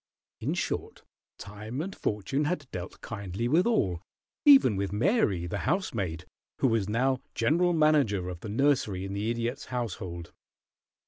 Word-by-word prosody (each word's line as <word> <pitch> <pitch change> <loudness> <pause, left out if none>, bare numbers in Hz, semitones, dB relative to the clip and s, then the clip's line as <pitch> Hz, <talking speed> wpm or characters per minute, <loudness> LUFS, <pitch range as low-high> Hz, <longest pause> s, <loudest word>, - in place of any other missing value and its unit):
In - - -1
short, - - -3 0.3
time 105 +5 -7
and 190 +5 -4
fortune 115 +8 -1
had 155 -2 -1
dealt 90 0 -7
kindly 100 0 -4
with 165 - +3
all, 95 - +1 0.4
even 270 - +7
with 100 0 -2
Mary, 105 - +2
the 85 - -3
housemaid, 100 - -1 0.3
who 130 - +3
was 110 -3 0
now 130 +4 +1 0.2
general 175 +4 +3
manager 145 - +3
of 90 -2 -6
the 105 - -7
nursery 110 -6 +1
in 95 - -5
the 105 +3 -1
Idiot's 120 +4 -2
household. 95 -9 -5
115 Hz, 145 wpm, -28 LUFS, 95-145 Hz, 0.4 s, even